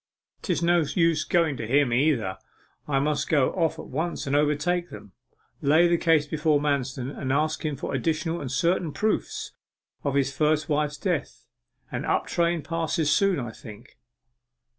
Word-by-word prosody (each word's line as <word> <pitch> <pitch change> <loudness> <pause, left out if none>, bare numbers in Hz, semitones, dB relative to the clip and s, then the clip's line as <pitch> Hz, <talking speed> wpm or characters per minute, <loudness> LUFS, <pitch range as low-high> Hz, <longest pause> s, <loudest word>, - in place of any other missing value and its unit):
''Tis - - -1
no 175 +1 +4
use 165 0 +1
going 165 -5 +1
to 110 - -5
him, 135 0 +3
either. 120 -8 +1 0.5
I 140 -2 +1
must 145 +1 0
go 145 -5 +3
off 165 -4 0
at - - -8
once 160 +6 -3
and 140 +1 0
overtake 150 +4 +1
them 105 - -11 0.5
lay 155 +5 +5
the 170 - +3
case 160 -3 +3
before 150 0 +1
Manston, 135 -3 -1
and 130 -2 -3
ask 155 +3 0
him 150 -2 -1
for 135 - -5
additional 160 +5 -1
and 135 -3 -5
certain 165 +3 0
proofs 215 0 -2 0.5
of 140 -1 -1
his 140 -1 +1
first 155 +1 +1
wife's 150 -1 0
death. - - -3 0.5
An - - -3
up - - 0
train 170 -2 0
passes 165 -2 -1
soon, 195 -2 +3
I 120 -3 -5
think. 110 +2 -13
150 Hz, 165 wpm, -26 LUFS, 140-165 Hz, 0.5 s, lay